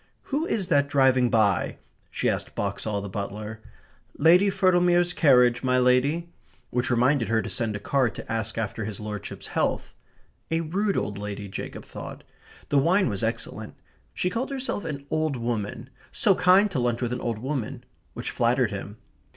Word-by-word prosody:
"Who 310 +4 +1
is 195 -4 -1
that 140 -3 +3
driving 130 -3 +3
by?" 110 -3 +2 0.3
she - - -1
asked - - -2
Boxall, 100 +1 -2
the 100 - -5
butler. 105 +2 -5 0.6
"Lady 175 +6 +6
Firtlemere's 175 -2 +3
carriage, 125 -7 +4
my 130 -1 +2
lady," 140 +7 +2 0.4
which 125 +1 0
reminded 125 +1 +2
her 115 0 +2
to - - -4
send 115 -4 -1
a - - -4
card 130 -1 +1
to - - -7
ask 110 0 -2
after 115 0 -2
his 105 -2 -5
lordship's 105 -2 -6
health. - - -1 0.6
A 165 0 +1
rude 195 +5 -1
old 100 -1 -2
lady, 100 0 -5
Jacob 95 - -7
thought. - - -9 0.5
The 145 - +4
wine 180 +4 +3
was 100 -3 -2
excellent. - - -3 0.4
She 180 - -1
called 245 +4 -2
herself 265 -8 -3
"an 140 -3 -5
old 155 -2 0
woman" 115 +1 -3 0.2
"so 205 - +3
kind 190 +3 +4
to 145 - -1
lunch 120 0 0
with 120 0 -1
an 125 - -4
old 115 -2 -2
woman" 130 0 -4 0.3
which - - -4
flattered 120 -1 +2
him. 100 +1 -6
125 Hz, 170 wpm, -26 LUFS, 110-165 Hz, 0.6 s, Lady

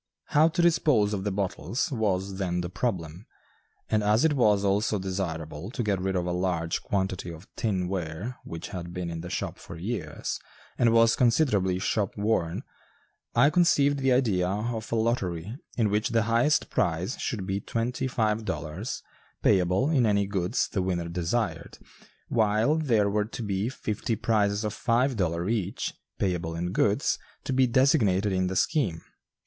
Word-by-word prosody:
How 155 +2 +5
to 170 +2 0
dispose 145 -11 +3
of 95 -1 -3
the 105 - 0
bottles 100 - -2
was 100 -5 -1
then 90 -2 -1
the 85 0 -5
problem, 90 -4 -3 0.6
and 110 - +1
as 105 +7 +3
it 160 - +3
was 105 -7 +3
also 105 +2 +2
desirable 85 -4 -4
to 120 0 -3
get 100 -3 0
rid 95 0 -1
of 90 -1 0
a 90 - -1
large 90 -2 -1
quantity 95 -3 -2
of 85 +3 -10
tin 95 -5 -1
ware 90 +6 -4
which 85 0 -7
had 85 -1 -6
been 90 -2 -3
in 80 -1 -5
the 90 - -7
shop - - -3
for 85 - -9
years 105 +9 -4 0.4
and 120 -1 +3
was 115 0 +5
considerably 115 - +2
"shop 100 +2 -1
worn," 100 -6 0 0.7
I 140 +5 +5
conceived 145 -4 +3
the 135 -1 +2
idea 110 -9 +2
of 110 +3 -3
a - - +1
lottery 110 -4 -1 0.2
in 110 -4 +2
which 105 +1 +1
the 115 -1 +2
highest 115 +7 +2
prize 85 - 0
should 105 -7 -3
be 95 +1 -1
twenty 120 +5 -2
five 110 -3 0
dollars, 90 +2 -4 0.4
payable 95 - +3
in 130 -7 +3
any 100 -1 +2
goods 95 -2 0
the 95 - -2
winner 90 -2 -1
desired, 85 0 -2 0.5
while 110 +4 +2
there 120 -10 +2
were 105 +1 +1
to 115 +2 -6
be 100 +2 -1
fifty 115 -3 -2
prizes 105 -2 +1
of 105 -1 -2
five 125 +4 +1
dollars 90 0 0
each, 100 -4 -2 0.2
payable 85 -3 -1
in 90 +1 -2
goods, - - +1 0.2
to 135 - -2
be 130 0 +4
designated 110 -6 +3
in 95 -1 +1
the 95 - -3
scheme. 95 - +1
105 Hz, 170 wpm, -27 LUFS, 90-115 Hz, 0.7 s, How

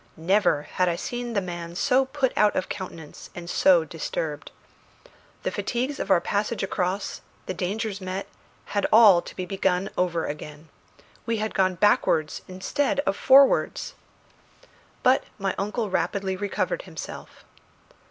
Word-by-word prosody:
Never 170 -3 +2
had 180 +3 0
I 170 - 0
seen 240 +5 -4
the 200 - +1
man 175 -2 -6
so 260 +7 +3
put 265 -1 -1
out 210 -1 +3
of 185 - -1
countenance 170 -6 -8
and 175 -1 -7
so 175 -1 +4
disturbed. 155 -1 -4 0.9
The - - -1
fatigues 255 +4 -2
of - - -3
our 190 -3 +5
passage 210 +4 -1
across, 190 0 -2 0.2
the - - -3
dangers 200 +3 -3
met, 185 +1 -4 0.5
had 205 - +1
all 210 -6 +8
to - - -11
be 185 - -4
begun 190 0 0
over 170 -2 0
again. 150 +1 -7 0.6
We 230 -1 0
had 215 0 -2
gone 185 -2 +2
backwards 165 -5 +2
instead 280 +11 -1
of 195 -8 -1
forwards! 270 +5 +4 1.1
But 255 +1 +4
my 195 -1 -1
uncle 210 +1 -2
rapidly 190 +2 -1
recovered 205 - -2
himself. - - -9
195 Hz, 145 wpm, -25 LUFS, 175-215 Hz, 1.1 s, all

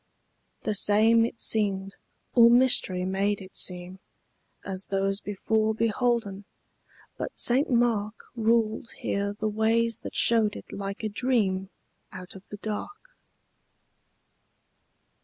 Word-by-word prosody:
The 215 - -1
same 220 +3 +4
it 235 - -6
seemed, 195 -3 0 0.4
or 235 -1 +7
mystery 235 -7 +3
made 195 +2 0
it 190 -1 -12
seem, 180 +1 -2 0.7
As 190 -1 -1
those 195 +1 -1
before 215 +2 -1
beholden; 225 -3 -1 0.7
but - - -5
St. 260 +4 +2
Mark 230 -4 +1 0.2
Ruled 225 0 +1
here 200 0 -2
the 215 - -1
ways 225 +1 +1
that - - -9
showed 225 -3 +3
it - - -10
like 200 +1 -6
a - - 0
dream 205 -5 0 0.4
Out 185 -2 -9
of 195 +1 -14
the 205 - -8
dark. 315 - -6
210 Hz, 120 wpm, -26 LUFS, 195-230 Hz, 0.7 s, or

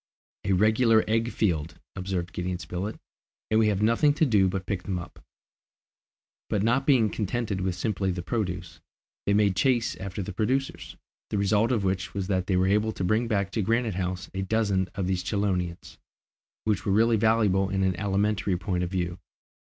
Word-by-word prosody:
"A 100 - +2
regular 110 +3 +4
egg 115 +2 +1
field," 80 -5 -1 0.2
observed 90 -2 -3
Gideon 90 0 -2
Spilett, 95 +4 -5 0.5
"and 110 - +4
we 110 - +4
have 105 -1 +1
nothing 130 +7 +3
to 160 - +3
do 105 -8 +4
but 95 - -1
to - - -28
pick 95 -1 -2
them 95 0 -3
up." 90 +1 -9 1.3
But 100 - 0
not 125 +5 +1
being 125 -6 +5
contented 105 -2 -2
with 90 -1 -1
simply 95 0 -1
the 90 -1 -3
produce, 90 -3 -3 0.5
they 100 - +3
made 100 -2 +3
chase 120 +4 +2
after 95 +1 -5
the 100 - -6
producers, 130 +8 -2 0.3
the - - -1
result 105 +4 +2
of 115 -5 +1
which 95 0 -2
was 100 -1 -1
that 95 -2 0
they 95 - +2
were 90 - +3
able 105 +3 +2
to - - -4
bring 110 +6 +1
back 100 -4 0
to 110 - -1
Granite 115 +2 +1
House 90 0 -3
a 95 - -2
dozen 100 -2 0
of 95 - -1
these 90 -1 -1
chelonians, 90 -4 -2 0.6
which 105 -3 0
were 100 - 0
really 115 +3 +4
valuable 105 -3 +2
in 95 0 0
an 95 -1 +1
alimentary 100 -1 0
point 90 -1 -2
of 90 - -2
view. 90 -2 -2
100 Hz, 190 wpm, -27 LUFS, 90-110 Hz, 1.3 s, being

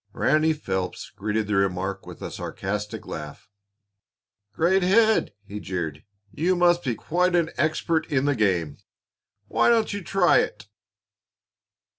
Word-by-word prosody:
Ranny 155 +1 +2
Phelps 95 -12 -4
greeted 105 +2 -2
the 105 - -2
remark 95 0 -1
with - - -10
a - - -5
sarcastic 105 +2 -5
laugh. 75 +3 -8 1.0
"Great 175 - +2
head!" 220 +4 +3
he 105 +1 -7
jeered. 85 -7 -4 0.3
"You 175 +8 +1
must 175 0 +3
be 125 -4 -1
quite 180 +8 0
an 170 -2 +1
expert 155 +1 0
in 140 -1 +2
the 145 - +3
game. 90 - 0 0.7
Why - - +3
don't 225 -3 +2
you 205 -2 -4
try 180 0 +4
it?" 105 -2 -3
130 Hz, 135 wpm, -25 LUFS, -, 1.0 s, try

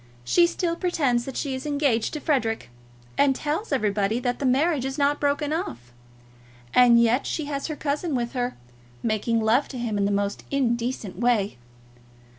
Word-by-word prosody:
She 345 - +4
still 340 0 -1
pretends 285 -10 0
that 270 - -6
she 280 -3 -2
is 260 +3 -5
engaged 280 -6 +1
to 305 - -3
Frederic, 230 - -1 0.5
and 275 -2 +4
tells 305 +10 -3
everybody 210 -3 +1
that 245 0 -1
the 275 - 0
marriage 280 +2 +2
is 270 +2 -3
not 290 0 +2
broken 290 +1 0
off, 120 - -5 0.8
and 245 -2 +7
yet 235 +3 +2
she 310 - -2
has 280 -1 -3
her 310 - -4
cousin 295 +1 -2
with 240 -1 -1
her, 250 -1 -2 0.5
making 225 +1 0
love 225 +6 +3
to 260 - -7
him 225 -4 -2
in 200 - +2
the 200 - +1
most 200 0 -1
indecent 240 -5 -1
way. 225 - +1
255 Hz, 175 wpm, -25 LUFS, 225-290 Hz, 0.8 s, and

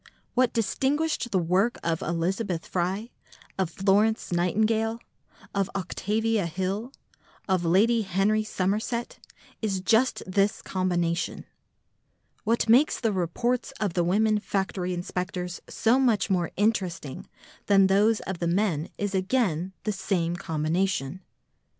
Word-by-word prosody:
What 255 -1 +3
distinguished 270 +5 0
the 195 - +1
work 185 +7 +2
of 165 -1 -1
Elizabeth 175 +1 -1
Fry, 190 +6 -2 0.5
of 190 -3 +1
Florence 200 +5 +2
Nightingale, 220 +6 +1 0.5
of 195 -1 0
Octavia 210 +2 0
Hill, 190 +8 -3 0.6
of 185 -3 +1
Lady 220 +7 +4
Henry 200 +2 +1
Somerset 215 +4 -2 0.4
is 200 -4 -1
just 225 +7 +2
this 195 +2 +1
combination. 175 -2 -1 1.0
What 230 +2 +1
makes 250 +7 +5
the 225 -4 0
reports 235 +9 -1
of 205 -5 -1
the 175 - +1
women 210 +4 +2
factory 190 -3 -2
inspectors 180 0 -4
so 235 +4 +2
much 220 -6 +2
more 175 -3 +1
interesting 185 -9 -1 0.4
than 195 -1 +6
those 205 +3 +3
of 190 -3 -5
the 170 - -1
men 170 -4 0
is 205 -1 -2
again 190 -3 0
the 215 - 0
same 175 -3 -1
combination. 165 -1 -1
195 Hz, 120 wpm, -26 LUFS, 180-220 Hz, 1.0 s, than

